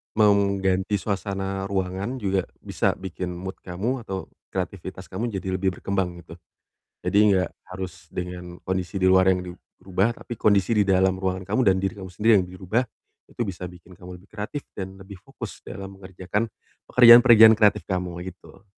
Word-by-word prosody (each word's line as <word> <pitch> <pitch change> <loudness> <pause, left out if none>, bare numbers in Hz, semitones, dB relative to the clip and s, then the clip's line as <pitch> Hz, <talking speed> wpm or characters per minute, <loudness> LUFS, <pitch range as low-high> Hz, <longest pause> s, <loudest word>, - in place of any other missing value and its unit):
mau 105 -1 +5
mengganti 100 -1 +1
suasana 95 -1 -3
ruangan 95 +4 -2
juga 95 -4 -1
bisa - - -1
bikin 90 -1 -5
mood 90 +2 -6
kamu 110 +8 -3
atau 95 -3 -5 0.2
kreativitas 95 0 -5
kamu 115 +6 -3
jadi 95 0 -3
lebih 95 -1 0
berkembang 95 -3 -2
gitu. 85 - -12 0.7
Jadi 90 +3 +1
enggak 95 -1 +2 0.2
harus 90 0 -7
dengan 90 -1 -6
kondisi 95 +1 -2
di 95 - +3
luar 95 0 +5
yang 90 - +1
dirubah, 95 +4 -3
tapi 120 - -7
kondisi 105 +1 +2
di 105 - +4
dalam 95 -1 +3
ruangan 95 0 -3
kamu 110 +5 +1
dan - - +1
diri 95 0 -2
kamu 95 -2 -9
sendiri 105 +5 +2
yang - - -9
dirubah. 95 +6 -1 0.5
Itu 120 - -3
bisa 90 -1 -6
bikin 90 +1 -15
kamu 90 -1 -11
lebih 95 - -22
kreatif 110 +8 -6
dan 95 0 -6
lebih 95 +1 -11
fokus - - -9
dalam 95 0 -8
mengerjakan 95 +3 -4 0.4
pekerjaan-pekerjaan 120 -2 +9
kreatif 105 -1 +3
kamu 90 -2 -2 0.2
gitu. 95 +2 -13
95 Hz, 165 wpm, -24 LUFS, 90-100 Hz, 0.7 s, pekerjaan-pekerjaan